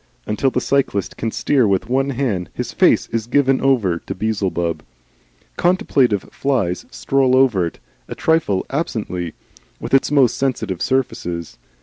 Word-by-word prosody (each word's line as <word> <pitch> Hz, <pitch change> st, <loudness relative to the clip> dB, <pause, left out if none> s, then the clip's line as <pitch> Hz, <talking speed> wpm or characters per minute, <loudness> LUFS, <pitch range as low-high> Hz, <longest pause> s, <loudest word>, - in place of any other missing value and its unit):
Until 105 Hz, +6 st, 0 dB
the 125 Hz, -, -1 dB
cyclist 125 Hz, -8 st, 0 dB
can 115 Hz, -, -2 dB
steer 115 Hz, +2 st, +2 dB
with 100 Hz, +2 st, 0 dB
one 135 Hz, +3 st, +1 dB
hand, 120 Hz, -, -2 dB
his -, -, -4 dB
face -, -, +3 dB
is 115 Hz, -1 st, -2 dB
given 135 Hz, 0 st, +2 dB
over 110 Hz, -11 st, +2 dB
to -, -, -7 dB
Beelzebub. 90 Hz, -6 st, -1 dB, 0.8 s
Contemplative 135 Hz, -, +2 dB
flies 115 Hz, -11 st, -1 dB
stroll 135 Hz, -2 st, +1 dB
over 115 Hz, -10 st, +3 dB
it, -, -, -9 dB, 0.3 s
and -, -, -7 dB
trifle 160 Hz, -13 st, +1 dB
absently 105 Hz, -, -3 dB, 0.4 s
with -, -, -7 dB
its 135 Hz, -, +4 dB
most 135 Hz, -5 st, +3 dB
sensitive 120 Hz, -9 st, -2 dB
surfaces. 90 Hz, -, -2 dB
115 Hz, 140 wpm, -19 LUFS, 95-135 Hz, 0.8 s, its